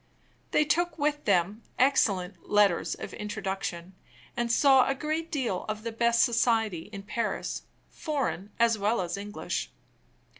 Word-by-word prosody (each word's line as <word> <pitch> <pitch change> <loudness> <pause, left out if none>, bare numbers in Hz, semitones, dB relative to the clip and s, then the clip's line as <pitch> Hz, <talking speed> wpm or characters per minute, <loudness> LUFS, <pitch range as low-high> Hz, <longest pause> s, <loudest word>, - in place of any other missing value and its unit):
They 300 - +3
took 335 +2 +1
with 295 0 -1
them 195 +6 +2 0.2
excellent 205 -8 +1
letters 205 -4 +3
of - - -8
introduction, 195 -4 -4 0.4
and 240 -1 0
saw 265 +1 +5
a 270 - +1
great 310 +3 -3
deal 250 - -1
of 215 0 -4
the 230 - -3
best 235 +1 +3
society 225 -7 +1
in 200 -2 -7
Paris, 220 +2 -3 0.3
foreign 270 - -3
as 230 -2 +3
well 210 +3 +1
as 175 -1 -3
English. 205 +2 -4
225 Hz, 140 wpm, -28 LUFS, 200-270 Hz, 0.4 s, saw